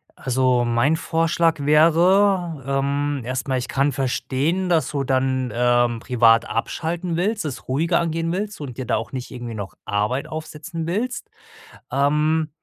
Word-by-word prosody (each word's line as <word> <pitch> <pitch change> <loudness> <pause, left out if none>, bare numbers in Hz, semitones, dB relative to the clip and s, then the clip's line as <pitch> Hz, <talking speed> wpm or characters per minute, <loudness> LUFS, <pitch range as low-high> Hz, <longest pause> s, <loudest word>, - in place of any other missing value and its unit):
Also, 130 -2 +1
mein 120 +7 +2
Vorschlag 165 -1 +1
wäre, 170 +1 +3
ähm 140 0 0
erstmal, 130 +1 -2
ich 125 - -3
kann 140 +2 +1
verstehen, 140 +7 -1
dass 165 -2 +2
du 140 -2 -1
dann, 130 -1 0
ähm, 120 -1 +2
privat 115 -2 +4
abschalten 165 +8 -2
willst, 200 +2 -1
es 140 - -6
ruhiger 165 +7 +1
angehen 165 0 -1
willst 205 +1 -3
und 130 -5 -7
dir 130 - -4
da - - +1
auch 110 -1 -6
nicht 130 0 -5
irgendwie 120 -3 -6
noch 95 -4 -7
Arbeit 105 +7 -1
aufsetzen 160 +1 -6
willst. 225 +9 -3 0.6
Ähm, 150 +3 +1
145 Hz, 145 wpm, -22 LUFS, 125-165 Hz, 0.6 s, privat